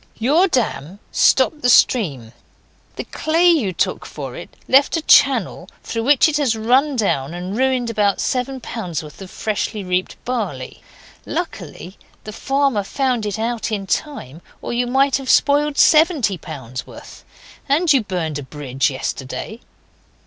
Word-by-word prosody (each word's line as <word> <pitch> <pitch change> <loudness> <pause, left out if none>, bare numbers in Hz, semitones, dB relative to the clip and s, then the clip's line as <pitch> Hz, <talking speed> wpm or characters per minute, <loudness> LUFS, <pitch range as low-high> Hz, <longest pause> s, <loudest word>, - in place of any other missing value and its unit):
Your 300 - +3
dam 200 - -2
stopped 285 +3 +3
the 245 - +2
stream; 140 - +2 0.6
the - - -5
clay 330 +3 +1
you 300 - +3
took 175 - -2
for - - -8
it - - -9 0.2
left 275 +5 +4
a 320 - -4
channel 230 - +3
through 230 -1 -4
which 285 +2 +5
it 305 -2 0
has 270 -6 +1
run 255 +6 +2
down 165 - -1
and 180 +3 -5
ruined 255 -1 0
about 205 -3 +1
seven 260 +1 -2
pounds' 180 -10 -5
worth 150 +4 -13
of 190 - -9
freshly 215 0 -3
reaped 180 0 -2
barley. 205 - -4 0.4
Luckily 185 +4 -6 0.2
the 215 - -8
farmer 270 -2 0
found 250 -1 -1
it 205 - -3
out 230 0 -3
in 200 -2 -3
time 180 - -4 0.2
or - - -5
you 245 +1 0
might 270 +2 +2
have 270 -2 -7
spoiled 290 +1 +3
seventy 305 - +4
pounds' 130 -7 -8
worth. - - -13 0.5
And 310 +3 +3
you 270 - +3
burned 170 -7 -3
a - - -6
bridge 135 -2 -2
yesterday. 135 - -5
230 Hz, 155 wpm, -19 LUFS, 180-275 Hz, 0.6 s, which